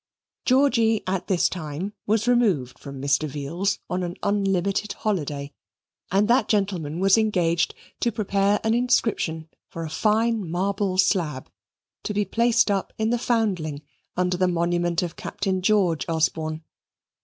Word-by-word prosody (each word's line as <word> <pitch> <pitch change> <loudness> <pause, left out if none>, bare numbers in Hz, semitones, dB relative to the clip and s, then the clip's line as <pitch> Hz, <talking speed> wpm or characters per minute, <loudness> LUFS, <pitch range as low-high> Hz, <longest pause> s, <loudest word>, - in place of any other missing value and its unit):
Georgy 245 -5 +3
at 185 0 -2
this 185 -3 +3
time 170 +3 -5
was 220 +2 +1
removed 200 - +2
from 140 -1 -8
Mr. 140 +3 +1
Veal's 165 +8 -2
on 180 +1 -2
an 175 0 -4
unlimited 200 0 0
holiday, 145 -8 -3 0.6
and 200 +2 +3
that 245 +3 +3
gentleman 185 -7 -1
was 195 +3 +5
engaged 175 -6 +1 0.2
to 235 - +1
prepare 200 -1 +1
an 220 0 +2
inscription 225 -9 0 0.2
for 165 - -6
a 160 - -6
fine 220 -1 +1
marble 190 +2 -1
slab, 160 -8 +1 0.5
to 210 - -4
be 205 0 +1
placed 235 +2 +2
up 195 -1 -1
in 220 +1 0
the 240 - +1
Foundling 185 -12 -1 0.3
under 180 0 +1
the 185 0 +2
monument 175 0 0
of 175 - -4
Captain 190 -2 -2
George 185 -5 +2
Osborne. 160 -1 -1
190 Hz, 145 wpm, -24 LUFS, 165-215 Hz, 0.6 s, was